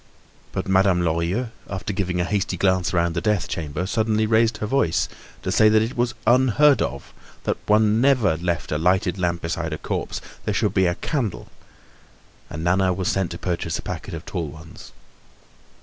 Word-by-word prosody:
But -, -, -3 dB
Madame 95 Hz, -1 st, +3 dB
Lorilleux, 85 Hz, +8 st, 0 dB, 0.2 s
after 95 Hz, +1 st, -4 dB
giving 90 Hz, -2 st, -1 dB
a -, -, +2 dB
hasty 95 Hz, -1 st, -1 dB
glance 95 Hz, 0 st, +2 dB
round 85 Hz, -1 st, +1 dB
the 85 Hz, -, -2 dB
death 105 Hz, -2 st, 0 dB
chamber, 80 Hz, +2 st, -3 dB
suddenly 110 Hz, +1 st, +1 dB
raised 110 Hz, +1 st, +3 dB
her -, -, -3 dB
voice 105 Hz, -8 st, +1 dB, 0.4 s
to -, -, -1 dB
say 110 Hz, -, +5 dB
that 110 Hz, 0 st, +4 dB
it 115 Hz, +3 st, -4 dB
was 120 Hz, 0 st, 0 dB
unheard 130 Hz, +2 st, +4 dB
of, 70 Hz, 0 st, -4 dB, 0.3 s
that -, -, -1 dB
one 110 Hz, +1 st, +4 dB
never 125 Hz, -10 st, +3 dB
left 85 Hz, 0 st, -2 dB
a 75 Hz, -, 0 dB
lighted 95 Hz, +2 st, +1 dB
lamp 85 Hz, -1 st, -1 dB
beside 85 Hz, -1 st, -2 dB
a -, -, -3 dB
corpse; -, -, -3 dB, 0.2 s
there -, -, -2 dB
should -, -, +1 dB
be 95 Hz, -1 st, +3 dB
a 85 Hz, -, 0 dB
candle, 125 Hz, -, -3 dB, 1.0 s
and 80 Hz, +2 st, -6 dB
Nana 95 Hz, +2 st, +2 dB
was 95 Hz, -1 st, -1 dB
sent 95 Hz, -2 st, 0 dB
to 85 Hz, -, -6 dB
purchase 85 Hz, -1 st, -2 dB
a -, -, -8 dB
packet -, -, -5 dB
of -, -, -8 dB
tall 85 Hz, -3 st, -3 dB
ones. 80 Hz, +2 st, -12 dB
95 Hz, 185 wpm, -23 LUFS, 85-110 Hz, 1.0 s, say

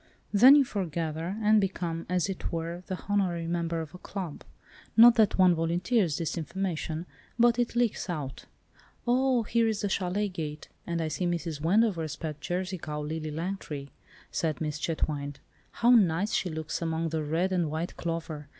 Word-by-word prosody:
Then 250 Hz, +7 st, +9 dB
you 285 Hz, -2 st, +5 dB
foregather, 170 Hz, -3 st, -3 dB
and 215 Hz, 0 st, +5 dB
become, 175 Hz, -4 st, -3 dB
as 180 Hz, 0 st, +1 dB
it 195 Hz, -2 st, -4 dB
were, 170 Hz, +1 st, -3 dB
the 185 Hz, -, -3 dB
honorary 185 Hz, -5 st, 0 dB
member 170 Hz, -1 st, -1 dB
of 160 Hz, -2 st, -8 dB
a 180 Hz, -, -10 dB
club. 185 Hz, -7 st, -6 dB, 0.5 s
Not 235 Hz, +1 st, +10 dB
that 220 Hz, -4 st, +3 dB
one 185 Hz, -2 st, +6 dB
volunteers 170 Hz, -, +1 dB
this 170 Hz, +1 st, -2 dB
information, 170 Hz, -1 st, -3 dB, 0.3 s
but 240 Hz, 0 st, +4 dB
it 240 Hz, 0 st, 0 dB
leaks 240 Hz, -5 st, 0 dB
out." 145 Hz, -6 st, -5 dB, 0.6 s
"Oh, 250 Hz, 0 st, +3 dB
here 230 Hz, +1 st, +2 dB
is 220 Hz, -2 st, -1 dB
the 205 Hz, -, 0 dB
châlet 195 Hz, +1 st, -1 dB
gate, 150 Hz, -3 st, -5 dB, 0.2 s
and 170 Hz, -1 st, -1 dB
I -, -, -1 dB
see 175 Hz, +4 st, -1 dB
Mrs. 165 Hz, -3 st, -3 dB
Wendover's 170 Hz, -4 st, +2 dB
pet 155 Hz, -2 st, -6 dB
Jersey 180 Hz, +3 st, -3 dB
cow, 150 Hz, -1 st, -5 dB
'Lily 155 Hz, +1 st, -4 dB
Langtry,'" 155 Hz, -4 st, -5 dB, 0.4 s
said 160 Hz, -2 st, -1 dB
Miss 150 Hz, -1 st, -3 dB
Chetwynde. 145 Hz, -3 st, -2 dB, 0.3 s
"How 240 Hz, +1 st, +3 dB
nice 200 Hz, -3 st, +4 dB
she 185 Hz, -, +1 dB
looks 160 Hz, 0 st, -4 dB
among 165 Hz, 0 st, -1 dB
the 160 Hz, 0 st, -1 dB
red 165 Hz, +5 st, 0 dB
and 175 Hz, -4 st, +1 dB
white 160 Hz, +3 st, -3 dB
clover. 165 Hz, -3 st, -4 dB
170 Hz, 170 wpm, -28 LUFS, 160-195 Hz, 0.6 s, Not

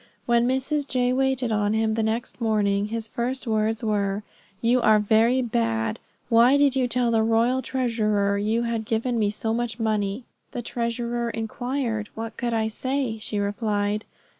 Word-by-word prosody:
When 235 Hz, 0 st, +3 dB
Mrs. 275 Hz, +3 st, -1 dB
J. 250 Hz, -1 st, +1 dB
waited 265 Hz, -2 st, +1 dB
on 210 Hz, -1 st, +1 dB
him 220 Hz, 0 st, +1 dB
the 225 Hz, -, 0 dB
next 225 Hz, +3 st, -2 dB
morning, 205 Hz, -2 st, +1 dB
his 225 Hz, 0 st, -3 dB
first 250 Hz, +4 st, -3 dB
words 220 Hz, 0 st, 0 dB
were, 205 Hz, -1 st, 0 dB, 0.4 s
"You 245 Hz, +2 st, +2 dB
are 215 Hz, -1 st, +5 dB
very 225 Hz, +5 st, +3 dB
bad; 115 Hz, -, -1 dB, 0.3 s
why 240 Hz, +4 st, +5 dB
did 285 Hz, -2 st, +3 dB
you 255 Hz, -2 st, +2 dB
tell 245 Hz, -1 st, +1 dB
the 225 Hz, -1 st, +3 dB
royal 230 Hz, +3 st, +2 dB
treasurer 215 Hz, -6 st, 0 dB
you 220 Hz, +3 st, 0 dB
had 230 Hz, -2 st, -2 dB
given 230 Hz, +2 st, 0 dB
me 210 Hz, -2 st, +2 dB
so 220 Hz, +2 st, -2 dB
much 235 Hz, -1 st, -2 dB
money?" 215 Hz, 0 st, -1 dB, 0.3 s
"The 240 Hz, -, -4 dB
treasurer 235 Hz, 0 st, -2 dB
inquired, 230 Hz, -1 st, -3 dB
what 225 Hz, 0 st, -5 dB
could 240 Hz, -1 st, -2 dB
I 220 Hz, -1 st, +1 dB
say?" 255 Hz, 0 st, -2 dB
she 215 Hz, -, -3 dB
replied. 205 Hz, 0 st, -1 dB
225 Hz, 165 wpm, -24 LUFS, 215-245 Hz, 0.4 s, are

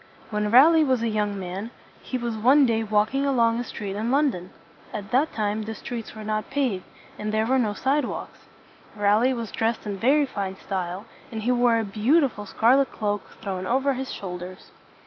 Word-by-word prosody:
When 210 Hz, 0 st, 0 dB
Raleigh 310 Hz, +8 st, +7 dB
was 260 Hz, -5 st, +1 dB
a 230 Hz, -, +1 dB
young 210 Hz, -2 st, -1 dB
man, 190 Hz, +4 st, -5 dB, 0.3 s
he 255 Hz, -, -3 dB
was 235 Hz, -2 st, -3 dB
one 260 Hz, +6 st, +5 dB
day 225 Hz, -2 st, +1 dB
walking 215 Hz, +5 st, +1 dB
along 235 Hz, -4 st, +2 dB
a -, -, -1 dB
street 200 Hz, -4 st, -6 dB
in 220 Hz, +3 st, -2 dB
London. 260 Hz, -10 st, +1 dB, 0.4 s
At 205 Hz, -1 st, -6 dB
that 275 Hz, +6 st, +2 dB
time 210 Hz, 0 st, -1 dB
the 220 Hz, +1 st, -5 dB
streets 235 Hz, -2 st, -7 dB
were 215 Hz, -, -8 dB
not 215 Hz, 0 st, -2 dB
paved, 260 Hz, -9 st, -1 dB, 0.3 s
and 210 Hz, 0 st, -2 dB
there 215 Hz, 0 st, +1 dB
were 260 Hz, +3 st, +2 dB
no 215 Hz, -4 st, +1 dB
sidewalks. 270 Hz, +2 st, -2 dB, 0.6 s
Raleigh 215 Hz, +5 st, +3 dB
was 230 Hz, -4 st, -5 dB
dressed 225 Hz, +1 st, -1 dB
in 205 Hz, -2 st, -3 dB
very 280 Hz, +8 st, +3 dB
fine 195 Hz, -7 st, -4 dB
style, 190 Hz, +1 st, -4 dB, 0.3 s
and 220 Hz, -2 st, -5 dB
he 245 Hz, -, +2 dB
wore 240 Hz, -1 st, +3 dB
a 225 Hz, -, 0 dB
beau 220 Hz, +10 st, +3 dB
ti 285 Hz, -, +3 dB
ful 210 Hz, -3 st, -9 dB
scar 235 Hz, +7 st, +4 dB
let 275 Hz, -1 st, +1 dB
cloak 205 Hz, -1 st, -3 dB
thrown 185 Hz, -3 st, -3 dB
over 270 Hz, +3 st, +2 dB
his 265 Hz, +1 st, -5 dB
shoulders. 180 Hz, -1 st, -7 dB
225 Hz, 200 wpm, -25 LUFS, 205-255 Hz, 0.6 s, Raleigh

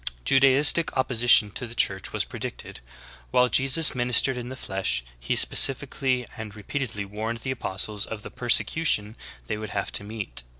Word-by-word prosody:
9. 135 Hz, -, +3 dB
Judaistic 140 Hz, +4 st, +4 dB
opposition 120 Hz, -4 st, +3 dB
to 125 Hz, -, -5 dB
the 120 Hz, -, -11 dB
Church 95 Hz, -4 st, -1 dB
was -, -, -2 dB
predicted. -, -, -9 dB, 0.5 s
While 125 Hz, 0 st, +2 dB
Jesus 135 Hz, +5 st, +4 dB
ministered 125 Hz, +1 st, +2 dB
in 125 Hz, 0 st, -7 dB
the 130 Hz, -, -8 dB
flesh 95 Hz, -, -3 dB, 0.2 s
He -, -, -3 dB
specifically 130 Hz, -2 st, +3 dB
and 110 Hz, -3 st, -9 dB
re 105 Hz, -, -12 dB
peatedly 110 Hz, -6 st, -5 dB
warned 110 Hz, +3 st, -6 dB
the 130 Hz, -, -4 dB
apostles 105 Hz, -3 st, -2 dB
of 105 Hz, -2 st, -8 dB
the -, -, -10 dB
persecution 120 Hz, -2 st, 0 dB, 0.3 s
they 105 Hz, -1 st, -5 dB
would 110 Hz, -1 st, -7 dB
have 100 Hz, -, -3 dB
to -, -, +2 dB
meet. 105 Hz, -, -6 dB
120 Hz, 170 wpm, -24 LUFS, 105-130 Hz, 0.5 s, Judaistic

